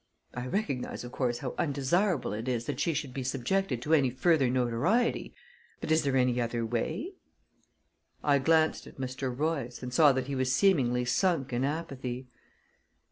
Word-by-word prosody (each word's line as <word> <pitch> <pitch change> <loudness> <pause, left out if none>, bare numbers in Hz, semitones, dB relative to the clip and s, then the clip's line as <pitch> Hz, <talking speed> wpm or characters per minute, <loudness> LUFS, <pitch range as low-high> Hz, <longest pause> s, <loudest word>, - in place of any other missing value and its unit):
I 125 +1 -4
recognize, 140 - -2
of 120 - -8
course, 125 -2 -1
how 125 0 -5
undesirable 150 - +1
it 110 +4 -5
is 120 -2 -1
that 145 -2 -4
she 160 +2 +1
should 145 -3 -3
be 135 - -3
subjected 130 +2 -1
to 155 - 0
any 140 -5 +4
further 135 +1 +2
notoriety, 125 - +1 0.4
but - - -4
is 160 +1 +4
there 140 -3 +1
any 125 -1 +2
other 115 0 -1
way?" 160 - -2 1.1
I 140 -1 +4
glanced 160 +3 +2
at - - -14
Mr. 130 0 -3
Royce, 140 -3 -2
and 125 0 -5
saw 150 -2 +6
that 130 0 -1
he 140 - -4
was 130 -1 0
seemingly 130 -8 +3
sunk 135 +1 +1
in 120 +2 0
apathy. 135 -4 -3
130 Hz, 170 wpm, -29 LUFS, 125-160 Hz, 1.1 s, saw